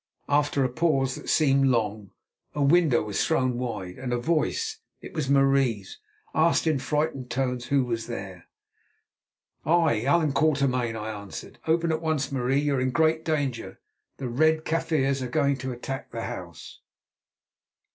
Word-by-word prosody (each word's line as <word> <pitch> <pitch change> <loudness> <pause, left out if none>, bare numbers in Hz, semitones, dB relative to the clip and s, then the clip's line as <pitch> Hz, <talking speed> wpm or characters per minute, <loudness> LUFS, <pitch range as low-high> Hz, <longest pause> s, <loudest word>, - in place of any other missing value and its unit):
After 145 -1 +2
a 130 - +1
pause 135 -2 +1
that - - -8
seemed 135 -3 +4
long, 110 -5 0 0.5
a 145 - +1
window 150 -3 +4
was 105 -2 -1
thrown 130 -6 +1
wide, 95 -7 -5
and 130 -1 -4
a 120 - +1
voice—it 440 - -2
was 150 -5 -2
Marie's—asked 135 - +1
in 155 -4 +2
frightened 140 -1 -2
tones 125 -1 -1
who 140 0 +2
was 115 -2 -3
there. 95 -6 -7 1.2
"I, 160 -8 +3
Allan 145 +4 +2
Quatermain," 140 -6 +1
I 110 0 -4
answered. 100 -2 -9
"Open 165 +1 +2
at 160 - -1
once, 155 -4 -1
Marie. 135 +1 +1
You 145 -2 0
are - - 0
in 130 - +1
great 160 +3 +2
danger; 145 -7 -2 0.4
the 135 - -4
Red 155 +6 +2
Kaffirs 155 -5 0
are 125 - -3
going 140 +1 +2
to 130 0 -4
attack 130 +2 -6
the - - -5
house." - - -8
135 Hz, 150 wpm, -26 LUFS, 125-155 Hz, 1.2 s, seemed